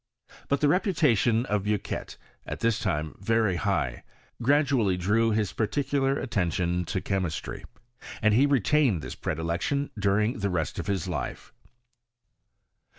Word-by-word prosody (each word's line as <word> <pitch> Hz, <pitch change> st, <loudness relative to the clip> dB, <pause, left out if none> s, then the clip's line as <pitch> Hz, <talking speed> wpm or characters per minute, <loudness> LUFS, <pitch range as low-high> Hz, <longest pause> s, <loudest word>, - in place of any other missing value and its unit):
But 140 Hz, -, 0 dB
the 150 Hz, -, +4 dB
reputation 145 Hz, -, +2 dB
of 105 Hz, -5 st, 0 dB
Bucqnet, 105 Hz, -1 st, -3 dB, 0.3 s
at -, -, -5 dB
that 115 Hz, 0 st, +3 dB
time 80 Hz, -7 st, -2 dB
very 110 Hz, -2 st, +1 dB
high, 85 Hz, -11 st, -1 dB, 0.4 s
gradually 130 Hz, -7 st, +3 dB
drew 110 Hz, +6 st, +2 dB
his 105 Hz, -3 st, 0 dB
particular 135 Hz, +3 st, 0 dB
attention 90 Hz, -5 st, -1 dB
to 95 Hz, -, -2 dB
chemistry, 95 Hz, -5 st, -3 dB, 0.5 s
and 110 Hz, -1 st, +3 dB
he 135 Hz, +6 st, +5 dB
retained 135 Hz, -, +2 dB
this -, -, -5 dB
predilection 85 Hz, -, -2 dB
during' 105 Hz, +3 st, +1 dB
the 100 Hz, -1 st, 0 dB
rest 85 Hz, -5 st, -2 dB
of -, -, -5 dB
his 95 Hz, -3 st, -1 dB
life. 90 Hz, -, -5 dB
105 Hz, 130 wpm, -27 LUFS, 90-135 Hz, 0.5 s, he